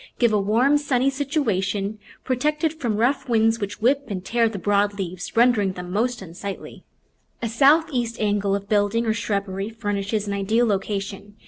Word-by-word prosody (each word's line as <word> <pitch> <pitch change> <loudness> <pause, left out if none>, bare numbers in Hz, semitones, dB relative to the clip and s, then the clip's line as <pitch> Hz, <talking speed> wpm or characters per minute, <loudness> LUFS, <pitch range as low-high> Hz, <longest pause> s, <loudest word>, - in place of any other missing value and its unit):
Give 235 -3 +3
a 210 - +3
warm, 240 +9 +3
sunny 275 -2 +1
situa 275 - 0
tion, 200 +2 -3 0.2
protected 300 +5 0
from 240 -9 -2
rough 265 +3 +1
winds, 225 0 +3
which 205 0 -5
whip 275 +3 +3
and 190 -4 -5
tear 230 +1 +2
the 215 - -6
broad 205 +1 +1
leaves, 185 +1 -5
rendering 225 -5 +4
them 180 -1 -7
most 230 +2 -1
unsightly. 190 +3 -8 0.6
A - - +1
southeast 265 -1 +2
angle 205 -2 +1
of 200 0 -5
building 210 +3 +1
or 220 - +2
shrubbery 200 -2 -2
furnishes 205 -1 -2
an 200 - -2
ideal 215 +4 +1
location. 200 0 -3
215 Hz, 165 wpm, -23 LUFS, 200-245 Hz, 0.6 s, rendering